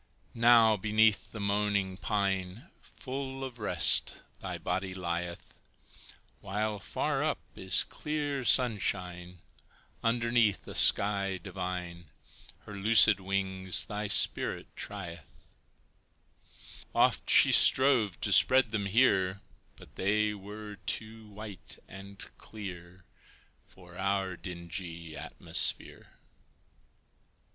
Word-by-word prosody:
Now, 115 -2 +4
beneath 110 +1 +1
the 110 - -9
moaning 100 -1 -1
pine, 95 0 -3
Full 135 0 -8
of 125 -3 -8
rest, 105 - +3 0.2
thy - - -6
body 95 +1 -4
lieth, 85 -1 -6 0.8
While 105 +1 -4
far - - -3
up - - -1 0.2
is 95 0 +3
clear 145 -3 -5
sunshine, 90 -7 +1 0.6
Underneath 115 -2 0
a - - -8
sky 100 -2 +4
divine, 90 -2 -7 0.5
Her 105 - -12
loosed 105 0 +5
wings 95 -1 0
thy 105 0 -5
spirit 100 - +1
trieth; 85 -5 -10 1.4
Oft - - +1
she - - +6
strove 130 -8 +5
to 105 - 0
spread 130 +2 +5
them 100 -3 -3
here, 100 -4 +1 0.3
But - - -17
they 105 +2 0
were 105 +1 -10
too 110 +2 -4
white 105 -2 -9
and 100 +1 -12 0.2
clear 90 -4 -11 0.6
For 90 -1 -17
our 95 -1 -2
dingy 85 -2 -8
atmosphere. - - -3
100 Hz, 100 wpm, -29 LUFS, 95-110 Hz, 1.4 s, she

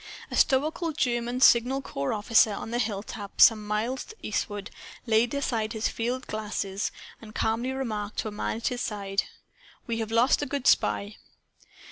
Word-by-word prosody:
A - - -3
stoical 310 +4 +2
German 245 -2 -1
signal 260 +3 +5
corps 140 - -3
officer, 220 +1 +4
on 220 +3 -5
a 240 - 0
hilltop 205 -1 -4
some 215 -2 +6
miles 225 +5 -1
to 440 - -12
eastward, 205 -1 -3 0.3
laid 225 0 +3
aside 230 -5 -1
his 220 0 0
field 245 +3 -3
glass 215 -1 -3
and 205 +2 -7
calmly 230 +4 0
remarked 215 -6 -4
to - - -1
a - - -4
man 210 +1 -3
at 230 - -1
his 245 -1 -4
side 200 -2 -2 0.6
"We 230 -1 -2
have 225 -1 -3
lost 235 +6 +3
a 290 - -2
good 275 -1 -3
spy!" 205 +1 +2
225 Hz, 165 wpm, -27 LUFS, 210-250 Hz, 0.6 s, some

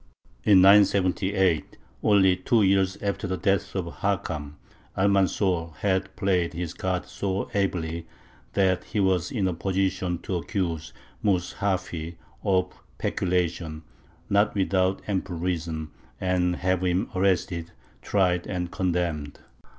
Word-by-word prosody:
In 95 +3 +6
978, 95 -2 +4 0.2
only 95 -3 +5
two 105 +4 +2
years 95 -1 +3
after 100 0 -1
the 95 0 -2
death 100 0 0
of 95 -3 -1
Hakam, 80 -7 -2 0.4
Almanzor 95 -4 +1
had 95 -1 -1
played 90 -4 +1
his 85 -1 -4
cards 95 -1 -3
so 100 0 -2
ably, 85 -4 -1 0.5
that 95 -2 +2
he 110 - -3
was 95 -3 +2
in 100 -6 0
a 90 - 0
position 95 0 -1
to 95 - -2
accuse 85 -4 -3 0.3
Mus 90 -4 +1
hafy 90 -4 -2 0.3
of 90 -1 +1 0.2
peculation 85 -3 -1 0.4
not 100 +1 +2
without 95 -1 +1
ample 95 -3 -2
reason 80 -3 -3 0.3
and 90 -1 +1
have 90 0 0
him 90 +3 0
arrested, 90 -3 0 0.3
tried, 90 -3 +1
and 90 -2 -3
condemned. 85 -5 -1
95 Hz, 120 wpm, -26 LUFS, 85-95 Hz, 0.5 s, In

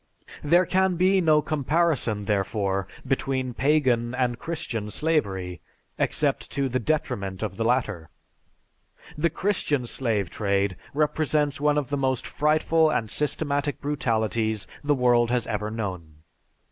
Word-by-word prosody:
There 175 +5 +4
can 190 +1 +2
be 185 +2 +3
no 155 -3 +4
comparison, 145 -8 0
therefore, 100 -1 0 0.2
between 130 -1 -1
Pagan 125 -3 +2
and 125 -2 0
Christian 115 -10 -4
slavery, 95 - -1 0.4
except - - 0
to 140 -1 0
the 130 0 -1
detriment 100 -8 -2
of 100 -3 -3
the 115 - -2
latter. 110 - 0 1.1
The 165 +2 +1
Christian 150 -8 0
slave 110 -7 -1
trade 100 -2 0 0.2
represents 150 -1 +1
one 150 0 +3
of 145 -2 -1
the 145 - -1
most 130 -2 0
frightful 155 +1 +2
and 110 -8 -1
systematic 145 -1 -1
brutalities 110 -6 -1 0.2
the 145 0 +2
world 120 -2 +3
has 120 -2 +1
ever 105 - -2
known. 90 -8 -6
130 Hz, 130 wpm, -25 LUFS, 110-150 Hz, 1.1 s, There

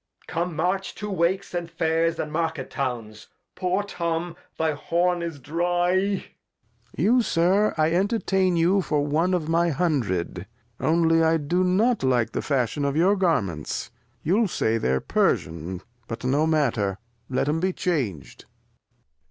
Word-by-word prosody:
Come, 170 0 -3
march 185 +4 -1
to 210 -1 -5
Wakes, 190 +2 0
and 175 -1 -3
Fairs, 165 0 0
and 150 - -3
Market 160 -4 -2
Towns. 115 -5 -4 0.3
Poor 185 +2 0
Tom, 170 -3 -3 0.2
thy 160 -1 +1
Horn 175 +4 0
is 165 -3 -4
dry. 175 +5 0
Lear. 195 +1 +1 0.7
You, 245 +3 +4
Sir, 195 +1 +2
I 155 +1 +2
entertain 190 -1 +1
you 180 +4 +3
for 150 -4 0
One 165 +5 +1
of 160 -4 -2
my 170 +1 +2
Hun 160 -1 +1
dred, 90 -3 -3 0.3
only 165 0 +3
I 165 0 +4
do 170 +5 0
not 215 +7 +2
like 125 -3 +1
the - - -2
Fashion 140 0 0
of 140 0 0
your 185 +5 +4
Garments; 110 - -1 0.3
you'll 205 +7 +2
say 115 -10 0
they're 65 - 0
Persian, 85 +4 -1 0.2
but 115 - -6
no 140 +5 +2
Matter, 120 -11 +1 0.3
let 130 +1 0
'em 155 +2 +1
be 185 +2 +1
chang'd. 130 - -3
165 Hz, 150 wpm, -25 LUFS, 140-180 Hz, 0.7 s, You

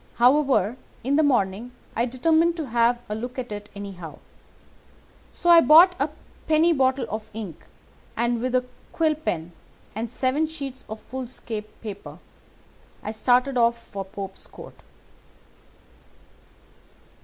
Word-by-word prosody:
However, 250 -4 +3 0.3
in 270 +4 +1
the 310 - +5
morning 240 -4 +1 0.2
I 235 +2 +1
determined 325 +7 +2
to 315 - -3
have 235 +1 +3
a 210 - -3
look 245 +4 -5
at 250 -3 -4
it 205 0 -6
anyhow, 190 -5 -8 1.1
so 345 - +2
I 335 -1 +9
bought 330 +7 +8
a 280 - +1 0.4
penny 320 +2 +4
bottle 265 -2 +2
of 215 0 -5
ink, 200 -8 -7 0.5
and 235 0 +1
with 255 0 -1
a 250 0 +2 0.3
quill 315 -2 +2
pen, 175 - -3 0.4
and 225 +2 -4
seven 265 +5 +1
sheets 275 -4 -7
of 220 0 -7
foolscap 240 -4 -6 0.2
paper, 205 -2 -8 0.9
I 215 - -3
started 250 +4 +2
off 235 0 +3
for 200 -3 -7
Pope's 195 0 -8
Court. - - -13
245 Hz, 130 wpm, -24 LUFS, 215-280 Hz, 1.1 s, I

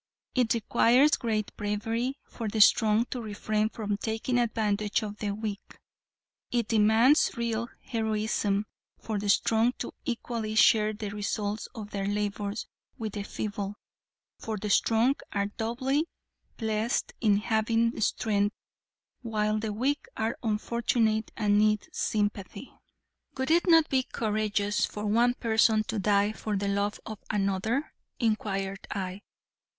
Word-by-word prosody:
It 245 -3 +2
requires 240 +5 +4
great 220 -6 -1
bravery 225 +6 -2
for 230 - -6
the 215 +1 -2
strong 215 +2 +5
to 250 - -3
refrain 215 0 -1
from 210 -3 -3
taking 225 +4 -1
advantage 215 -3 0
of 210 -1 -5
the 210 - -3
weak; 205 0 -5 0.7
it 235 -3 0
demands 225 +6 +5
real 235 0 -1
heroism 215 -3 0 0.3
for 215 -2 -3
the 205 0 -3
strong 225 +4 +3
to 245 - -6
equally 230 -2 -3
share 215 -1 +5
the 210 -1 -5
results 210 +1 -3
of 210 -2 -7
their 195 -1 -2
labors 205 +1 -2 0.3
with 220 -3 -4
the 205 - -3
feeble. 205 0 -4 0.6
For 220 -1 -4
the 210 +1 -3
strong 230 +7 +3 0.2
are 200 -1 +1
doubly 260 +9 -1 0.5
blessed 220 0 -1
in 210 -3 +4
having 225 +2 +1
strength 205 -1 +1 0.7
while 215 -2 0
the 215 0 -3
weak 265 +7 -1
are 225 +1 -1
unfortunate 220 0 0
and 205 -2 +3
need 215 +2 +2
sympathy." 205 - -2 0.7
"Would 265 +3 -1
it 345 +3 +3
not 325 -2 +6
be 265 -1 +2
courageous 210 -3 -1
for 210 0 -2
one 235 +4 +3
person 220 -2 +3
to 220 0 -3
die 205 +1 +3
for 215 -1 -3
the 200 0 -1
love 200 +1 -1
of 215 -2 -7
another?" 210 +7 -1 0.3
inquired 195 -4 -1
I. 190 0 -4
215 Hz, 135 wpm, -28 LUFS, 205-230 Hz, 0.7 s, not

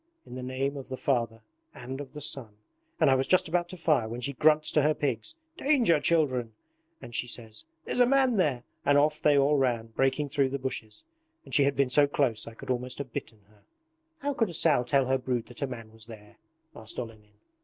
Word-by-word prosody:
"In - - -12
the 130 - -6
name 135 +2 -2
of 135 - -8
the 130 - -4
Father 115 -5 -1 0.3
and 130 +3 -6
of 140 - -10
the 150 - -8
Son," 130 -7 -3 0.4
and - - +5
I - - +6
was 130 0 +1
just 185 -1 +3
about 175 +1 0
to 185 - -7
fire 150 -9 +1
when 120 +2 -5
she 140 +3 -3
grunts 155 +3 +3
to 150 - +3
her 150 +1 +2
pigs: 135 - -2 0.2
"Danger, 255 - +3
children," 130 -9 +1 0.6
she 120 +1 -1
says, 115 -2 -6 0.2
"there's - - -2
a 245 - +6
man 265 -2 +3
here," 135 -8 +1 0.2
and 145 0 +4
off 150 +1 +2
they 145 -1 +4
all 140 +2 +4
ran, 120 -4 0
breaking 135 +2 +1
through 140 -1 +1
the 140 - -2
bushes. 130 -5 -5 0.4
And - - -12
she 140 - +5
had 140 0 +1
been 135 -2 +1
so 145 +2 +5
close 130 -6 0
I 115 - -9
could 130 - -5
almost 125 0 -3
have 130 -4 -7
bitten 110 -2 -6
her.' 105 0 -26 0.6
'How 285 +1 -1
could 225 -6 0
a 170 - -6
sow 150 -6 +4
tell 135 +2 +2
her 130 +1 +1
brood 125 -2 -2
that 120 - -11
a 140 - 0
man 115 -4 -8
was 110 0 -13
there?' 105 -2 -13 0.4
asked 110 0 -11
Olenin. 110 -3 -8
135 Hz, 225 wpm, -28 LUFS, 120-150 Hz, 0.6 s, I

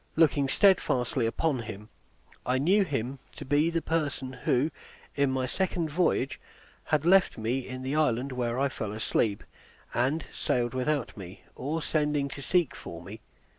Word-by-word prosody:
Looking 145 -4 +3
steadfastly 130 - +3
upon 140 +3 0
him, 105 -2 -7 0.5
I 125 +1 +1
knew 185 +10 +4
him 135 -5 -3
to - - -8
be 145 +4 +3
the 165 -1 -1
person 145 -5 -1
who, 130 +4 +1 0.4
in 140 -1 +2
my 130 -1 0
second 170 +2 -1
voyage, 160 -5 +1 0.5
had 155 0 +1
left 190 +2 +5
me 120 +4 -1
in 130 0 -6
the 135 +3 -2
island 140 -3 +1
where 125 -1 -1
I 140 - +3
fell 110 -6 -5
asleep, 110 -1 0 0.5
and 140 +6 +1
sailed 120 0 0
without 130 0 -1
me, 95 -1 -10
or 155 +4 -3
sending 150 -2 0
to 140 - -8
seek 165 0 +2
for 85 0 -8
me. 100 +5 -9
135 Hz, 160 wpm, -28 LUFS, 120-155 Hz, 0.5 s, left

